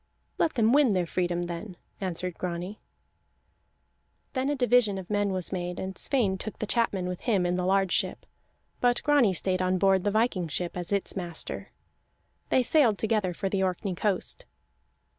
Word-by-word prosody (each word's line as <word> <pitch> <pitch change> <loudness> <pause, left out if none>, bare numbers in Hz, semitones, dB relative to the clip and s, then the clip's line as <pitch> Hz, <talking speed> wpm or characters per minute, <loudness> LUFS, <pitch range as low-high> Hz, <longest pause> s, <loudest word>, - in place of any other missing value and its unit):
"Let 325 - +1
them 230 -1 +3
win 280 -6 +5
their 180 -1 +1
freedom, 175 0 -1
then," 175 +2 -6 0.2
answered 180 -1 -3
Grani. 180 +3 -4 1.5
Then 265 +1 0
a 290 - +1
division 245 -5 +3
of 190 +1 -7
men 205 -1 +1
was 185 -2 0
made, 180 -1 -3
and 190 0 -4
Sweyn 205 -9 0
took 215 - -6
the - - -3
chapmen 205 -4 0
with 180 -1 -4
him 200 -7 +1
in 175 0 +1
the 180 0 -1
large 195 -1 +2
ship, - - 0 0.5
but 245 -1 +2
Grani 285 -8 +4
stayed 185 +1 0
on 185 0 +1
board 190 -1 +3
the 205 - +2
viking 210 -5 +1
ship 170 +3 -3
as 175 0 -4
its 200 -1 -1
master. 175 -4 -5 0.8
They 255 - +3
sailed 245 -6 +4
together 215 -4 0
for 195 +3 -3
the 190 0 0
Orkney 185 +1 -1
coast. 205 - -2
190 Hz, 175 wpm, -28 LUFS, 180-220 Hz, 1.5 s, win